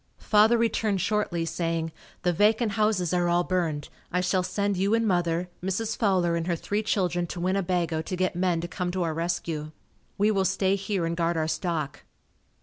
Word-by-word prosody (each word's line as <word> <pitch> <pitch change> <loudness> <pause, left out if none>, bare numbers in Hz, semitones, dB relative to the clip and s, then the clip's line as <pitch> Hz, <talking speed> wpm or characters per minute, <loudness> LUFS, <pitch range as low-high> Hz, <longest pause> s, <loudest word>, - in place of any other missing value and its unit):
Father 215 +2 +4
returned 220 -3 +1
shortly 190 -4 0
saying, 165 -1 -2 0.3
"The 180 -1 +2
vacant 215 +4 +3
houses 200 -4 +1
are 175 -1 +2
all 175 +1 +3
burned. 170 -5 -1 0.2
I 180 - +1
shall 185 +1 +1
send 200 +2 -1
you 195 +4 +2
and 230 -1 +1
mother, 175 -2 +1 0.2
Mrs. 215 +4 -1
Fowler 185 -6 +2
and 165 0 -2
her 175 - +1
three 205 +5 -2
children 180 -5 0
to 175 - -6
Winnebago 180 -3 0
to 185 - -4
get 185 0 0
men 175 -2 +1
to 170 - -4
come 180 +2 -3
to 185 -1 0
our 165 -2 -1
rescue. 160 -2 -3 0.4
We 210 +1 +3
will 195 -2 +2
stay 190 +1 +2
here 195 -2 -2
and 165 0 -1
guard 170 0 0
our 155 -1 0
stock." 160 -4 -2
180 Hz, 190 wpm, -27 LUFS, 170-200 Hz, 0.4 s, Father